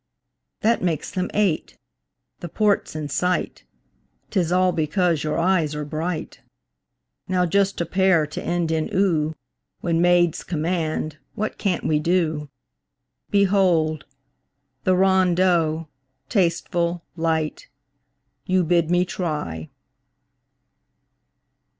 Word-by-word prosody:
That 230 Hz, +2 st, +2 dB
makes 165 Hz, -5 st, -1 dB
them 185 Hz, 0 st, -2 dB
eight. 195 Hz, -7 st, 0 dB, 0.6 s
The 175 Hz, -, -7 dB
port's 205 Hz, -2 st, +1 dB
in 155 Hz, -1 st, -3 dB
sight 180 Hz, +5 st, -1 dB, 0.7 s
'Tis 175 Hz, -5 st, 0 dB
all 185 Hz, 0 st, +3 dB
because 165 Hz, 0 st, +1 dB
your 155 Hz, 0 st, -1 dB
eyes 165 Hz, -3 st, +1 dB
are 150 Hz, 0 st, -3 dB
bright! 160 Hz, +3 st, -4 dB, 0.9 s
Now 185 Hz, -1 st, +2 dB
just 195 Hz, +3 st, +1 dB
a -, -, 0 dB
pair 185 Hz, -2 st, +3 dB
to 150 Hz, -, -6 dB
end 175 Hz, -1 st, -1 dB
in 160 Hz, -1 st, 0 dB
"oo" 160 Hz, -5 st, +1 dB, 0.5 s
When 170 Hz, -1 st, +1 dB
maids 175 Hz, -2 st, +3 dB
command, 155 Hz, -2 st, -2 dB, 0.2 s
what 215 Hz, +1 st, -3 dB
can't 190 Hz, -5 st, 0 dB
we 150 Hz, -1 st, +2 dB
do? 155 Hz, -3 st, 0 dB, 0.8 s
Behold! 185 Hz, -6 st, +2 dB, 0.8 s
the 185 Hz, -, +4 dB
rondeau, 180 Hz, -4 st, +2 dB, 0.4 s
tasteful, 175 Hz, -3 st, 0 dB
light, 160 Hz, -2 st, -1 dB, 0.8 s
You 185 Hz, 0 st, +3 dB
bid 170 Hz, -1 st, +2 dB
me 175 Hz, +1 st, +3 dB
try! 150 Hz, -, -4 dB
170 Hz, 105 wpm, -23 LUFS, 155-185 Hz, 0.9 s, the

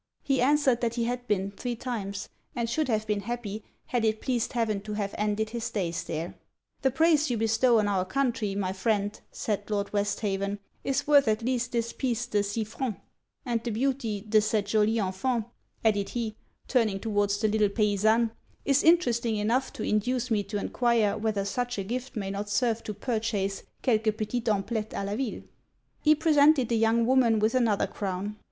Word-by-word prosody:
He 270 Hz, -2 st, +1 dB
answered 265 Hz, -2 st, +3 dB
that 235 Hz, -1 st, 0 dB
he 235 Hz, -, 0 dB
had 245 Hz, +1 st, -3 dB
been 200 Hz, -2 st, 0 dB
three 240 Hz, +4 st, -4 dB
times; 205 Hz, -5 st, -4 dB, 0.3 s
and 235 Hz, -1 st, -1 dB
should 295 Hz, +6 st, 0 dB
have 215 Hz, -3 st, 0 dB
been 210 Hz, -1 st, 0 dB
happy 215 Hz, -1 st, -5 dB, 0.2 s
had 245 Hz, -2 st, -1 dB
it 220 Hz, -1 st, +1 dB
pleased 245 Hz, -4 st, -1 dB
heaven 220 Hz, -4 st, 0 dB
to 210 Hz, +1 st, -6 dB
have 205 Hz, -1 st, -2 dB
ended 210 Hz, +1 st, -1 dB
his 235 Hz, -1 st, -3 dB
days 175 Hz, -5 st, -2 dB
there. 165 Hz, +1 st, -4 dB, 0.5 s
'The 265 Hz, -, +3 dB
praise 310 Hz, +2 st, +3 dB
you 240 Hz, -, 0 dB
bestow 225 Hz, +2 st, +3 dB
on 210 Hz, -1 st, +2 dB
our 195 Hz, -2 st, +1 dB
country, 230 Hz, -2 st, -1 dB
my 190 Hz, -2 st, -1 dB
friend,' 205 Hz, +1 st, -1 dB
said 205 Hz, -1 st, -3 dB
Lord 205 Hz, -1 st, -2 dB
Westhaven, 200 Hz, -1 st, -1 dB, 0.3 s
'is 275 Hz, +1 st, 0 dB
worth 285 Hz, -3 st, +5 dB
at 220 Hz, +1 st, +1 dB
least 250 Hz, 0 st, -1 dB
this 235 Hz, -1 st, -1 dB
piece 245 Hz, -2 st, -1 dB
de 210 Hz, -5 st, +1 dB
six 210 Hz, +2 st, -3 dB
francs, 250 Hz, -6 st, -3 dB, 0.5 s
and 235 Hz, -2 st, -1 dB
the 240 Hz, -, -2 dB
beauty 230 Hz, -3 st, -1 dB
de 215 Hz, +1 st, +3 dB
cette 215 Hz, -1 st, 0 dB
jolie 215 Hz, +2 st, +2 dB
enfant, 215 Hz, +4 st, -1 dB, 0.4 s
added 205 Hz, -2 st, +2 dB
he, 225 Hz, -3 st, -3 dB, 0.3 s
turning 220 Hz, -7 st, +2 dB
towards 205 Hz, -1 st, 0 dB
the 215 Hz, -, +1 dB
little 215 Hz, -1 st, +2 dB
paisanne, 215 Hz, +2 st, +2 dB, 0.3 s
'is 275 Hz, 0 st, +4 dB
interesting 240 Hz, -10 st, +3 dB
enough 235 Hz, +6 st, +1 dB
to -, -, -5 dB
induce 245 Hz, +4 st, 0 dB
me 215 Hz, -2 st, +3 dB
to 205 Hz, +1 st, -4 dB
enquire 230 Hz, -1 st, +1 dB
whether 210 Hz, -2 st, -1 dB
such 245 Hz, +3 st, -2 dB
a 195 Hz, -, -1 dB
gift 255 Hz, +6 st, -4 dB
may 195 Hz, -3 st, -3 dB
not 200 Hz, +1 st, -4 dB
serve 230 Hz, +2 st, +1 dB
to 210 Hz, -, -5 dB
purchase 210 Hz, -3 st, -1 dB, 0.2 s
quelques 220 Hz, -3 st, +2 dB
petites 230 Hz, +1 st, -2 dB
amplettes 215 Hz, +1 st, -1 dB
a 200 Hz, -, -2 dB
la 200 Hz, +1 st, -2 dB
ville.' 250 Hz, -2 st, -3 dB, 0.6 s
He 305 Hz, 0 st, +5 dB
presented 295 Hz, -4 st, +4 dB
the 235 Hz, -, +2 dB
young 225 Hz, +1 st, +3 dB
woman 245 Hz, -3 st, +4 dB
with 215 Hz, +2 st, +2 dB
another 230 Hz, -5 st, +2 dB
crown. 200 Hz, +1 st, -4 dB
220 Hz, 185 wpm, -28 LUFS, 205-245 Hz, 0.6 s, worth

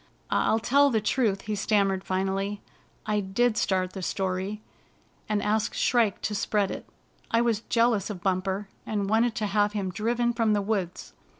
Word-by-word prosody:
" -, -, -28 dB
I'll 220 Hz, -, +3 dB
tell 280 Hz, +5 st, +4 dB
the 225 Hz, -4 st, +2 dB
truth," 215 Hz, -2 st, +1 dB
he 215 Hz, -, -4 dB
stammered 195 Hz, -2 st, +1 dB
finally. 195 Hz, +2 st, -1 dB, 0.2 s
" -, -, -34 dB, 0.2 s
I 210 Hz, -1 st, +1 dB
did 215 Hz, +4 st, +1 dB
start 185 Hz, -3 st, 0 dB
the 190 Hz, -, -6 dB
story, 190 Hz, +3 st, -2 dB, 0.7 s
and 210 Hz, -1 st, 0 dB
ask 215 Hz, +1 st, 0 dB
Shrike 230 Hz, -6 st, +2 dB
to 210 Hz, -, -1 dB
spread 200 Hz, -1 st, 0 dB
it. -, -, -7 dB, 0.4 s
I 230 Hz, -, +3 dB
was 230 Hz, -3 st, +1 dB
jealous 230 Hz, -4 st, +2 dB
of 185 Hz, -4 st, -6 dB
Bumper, 190 Hz, +1 st, -1 dB, 0.2 s
and 205 Hz, -2 st, -2 dB
wanted 225 Hz, +1 st, +3 dB
to 215 Hz, -, -1 dB
have 205 Hz, 0 st, +1 dB
him 195 Hz, -3 st, -2 dB
driven 240 Hz, +4 st, 0 dB
from 230 Hz, -2 st, +2 dB
the 205 Hz, -, +2 dB
woods. 195 Hz, -4 st, -3 dB
210 Hz, 180 wpm, -27 LUFS, 195-220 Hz, 0.7 s, tell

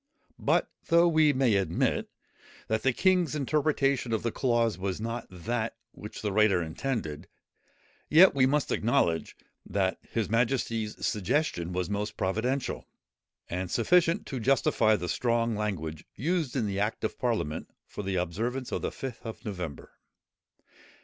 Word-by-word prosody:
But, -, -, +2 dB, 0.2 s
though 170 Hz, +1 st, +5 dB
we 155 Hz, -2 st, +5 dB
may 130 Hz, -4 st, +2 dB
admit, 95 Hz, -, 0 dB, 0.6 s
that 110 Hz, 0 st, 0 dB
the 135 Hz, -, +3 dB
king's 180 Hz, +1 st, +2 dB
interpretation 140 Hz, -3 st, +1 dB
of 110 Hz, -, 0 dB
the 115 Hz, -, 0 dB
clause 120 Hz, -4 st, +1 dB
was 95 Hz, +2 st, -3 dB
not 115 Hz, +1 st, -4 dB
that, 110 Hz, +6 st, -3 dB
which 105 Hz, -, -9 dB
the 105 Hz, -, 0 dB
writer 105 Hz, -2 st, +4 dB
intended, 80 Hz, -, -3 dB, 0.8 s
yet 175 Hz, +5 st, +8 dB
we 130 Hz, -2 st, +4 dB
must 145 Hz, +1 st, +1 dB
acknowledge, 110 Hz, -9 st, +1 dB, 0.3 s
that 95 Hz, -2 st, -1 dB
his 115 Hz, -4 st, -1 dB
majesty's 115 Hz, -1 st, 0 dB
suggestion 100 Hz, -, 0 dB
was 90 Hz, -1 st, -1 dB
most 105 Hz, +2 st, -3 dB
providential, 120 Hz, +8 st, -1 dB, 0.6 s
and 90 Hz, +1 st, -3 dB
sufficient 170 Hz, -, +3 dB
to 135 Hz, -, -4 dB
justify 115 Hz, -3 st, +3 dB
the 90 Hz, -3 st, -3 dB
strong 115 Hz, +2 st, +1 dB
language 85 Hz, -7 st, -3 dB
used 155 Hz, -, -1 dB
in 125 Hz, -5 st, +1 dB
the 100 Hz, -1 st, -2 dB
Act 105 Hz, +3 st, -1 dB
of 110 Hz, -, -3 dB
Parliament 110 Hz, -, -1 dB, 0.2 s
for -, -, -7 dB
the 95 Hz, -1 st, -2 dB
observance 115 Hz, +9 st, -2 dB
of -, -, -2 dB
the -, -, -2 dB
Fifth 130 Hz, -4 st, -7 dB
of 115 Hz, -1 st, -8 dB
November. 90 Hz, -8 st, -6 dB
115 Hz, 145 wpm, -28 LUFS, 95-135 Hz, 0.8 s, yet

